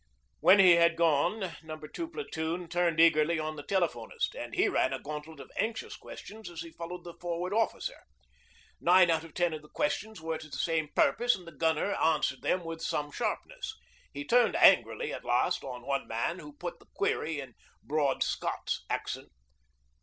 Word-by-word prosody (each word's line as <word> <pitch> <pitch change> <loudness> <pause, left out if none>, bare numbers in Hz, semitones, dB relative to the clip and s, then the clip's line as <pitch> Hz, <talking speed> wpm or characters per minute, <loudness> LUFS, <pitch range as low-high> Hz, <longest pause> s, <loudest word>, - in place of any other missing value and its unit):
When 195 - +7
he 185 -3 +8
had 170 0 +5
gone 170 +4 +2
No. 155 -1 -7
2 155 - -6
Platoon 175 - -4
turned 170 -1 +1
eagerly 165 0 +5
on 155 0 -3
the 145 - -6
telephonist, 160 - -1
and - - -6
he - - +3
ran - - +1
a - - -3
gauntlet 150 +1 -7
of - - -11
anxious 225 +1 -2
questions 220 0 -10
as 170 -2 -7
he 165 0 -8
followed 170 +2 -7
the 170 - -8
Forward 175 +2 -2
Officer. 225 +1 -1 0.8
Nine 180 0 +6
out 160 -1 +1
of 165 -2 -13
ten 175 -2 +1
of 155 - -5
the 150 - -17
questions 220 - -2
were 160 0 -3
to 155 -1 -11
the 135 - -6
same 160 0 0
purpose, 240 +1 +4
and 180 - -12
the 170 - -10
gunner 160 +5 +1
answered 150 -5 +1
them 180 -1 0
with 165 0 -6
some 145 -3 -2
sharpness. 440 - -3 0.4
He 290 - -6
turned 245 -2 +4
angrily 475 - +5
at - - -6
last - - +1
on 125 -2 -7
one 140 0 -1
man 115 +11 -2
who 150 0 -10
put 175 +1 -6
the - - -21
query 160 -5 0
in 135 -3 -8 0.3
broad 145 -2 +1
Scots - - -2
accent. - - -3
165 Hz, 185 wpm, -30 LUFS, 155-185 Hz, 0.8 s, he